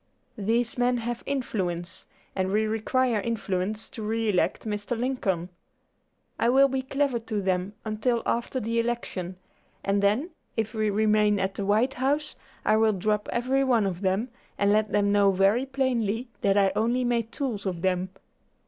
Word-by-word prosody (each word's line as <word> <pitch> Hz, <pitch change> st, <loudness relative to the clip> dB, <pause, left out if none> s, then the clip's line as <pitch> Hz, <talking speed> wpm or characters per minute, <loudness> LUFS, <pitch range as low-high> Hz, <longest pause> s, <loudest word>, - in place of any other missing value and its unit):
These 230 Hz, +4 st, 0 dB
men 245 Hz, 0 st, +3 dB
have 235 Hz, 0 st, -3 dB
influence, 185 Hz, -11 st, -3 dB, 0.3 s
and 190 Hz, -1 st, 0 dB
we 215 Hz, +2 st, +2 dB
require 225 Hz, +1 st, +1 dB
influence 210 Hz, -1 st, -2 dB
to 225 Hz, -, -8 dB
re 225 Hz, +1 st, -1 dB
elect 185 Hz, +2 st, +1 dB
Mr. 210 Hz, +2 st, -2 dB
Lincoln. 195 Hz, -9 st, -1 dB, 0.9 s
I 235 Hz, -, +3 dB
will 270 Hz, +2 st, +6 dB
be 265 Hz, 0 st, -1 dB
clever 275 Hz, -1 st, 0 dB
to 220 Hz, -2 st, -3 dB
them 185 Hz, 0 st, -1 dB
until 230 Hz, +2 st, 0 dB
after 240 Hz, +2 st, -1 dB
the 230 Hz, 0 st, -1 dB
election, 230 Hz, -6 st, -3 dB, 0.5 s
and 200 Hz, +1 st, +1 dB
then, 220 Hz, -, +1 dB, 0.3 s
if 220 Hz, 0 st, -1 dB
we 215 Hz, -1 st, 0 dB
remain 210 Hz, 0 st, +3 dB
at 190 Hz, 0 st, -1 dB
the 195 Hz, -1 st, -4 dB
White 225 Hz, +6 st, +3 dB
House, 290 Hz, +4 st, -1 dB, 0.3 s
I 215 Hz, -, +4 dB
will 220 Hz, -1 st, +4 dB
drop 210 Hz, +2 st, -1 dB
every 260 Hz, +3 st, +1 dB
one 240 Hz, -5 st, +3 dB
of 185 Hz, -2 st, -3 dB
them, 195 Hz, +6 st, 0 dB, 0.3 s
and 200 Hz, 0 st, +3 dB
let 215 Hz, -1 st, +2 dB
them 205 Hz, 0 st, +2 dB
know 200 Hz, -1 st, +5 dB
very 200 Hz, +8 st, +3 dB
plainly 250 Hz, -4 st, -1 dB
that 195 Hz, 0 st, +3 dB
I 195 Hz, -1 st, +4 dB
only 240 Hz, +3 st, +1 dB
made 235 Hz, -2 st, 0 dB
tools 230 Hz, -8 st, -3 dB
of 175 Hz, -3 st, -3 dB
them. 185 Hz, 0 st, +1 dB
220 Hz, 165 wpm, -26 LUFS, 200-245 Hz, 0.9 s, will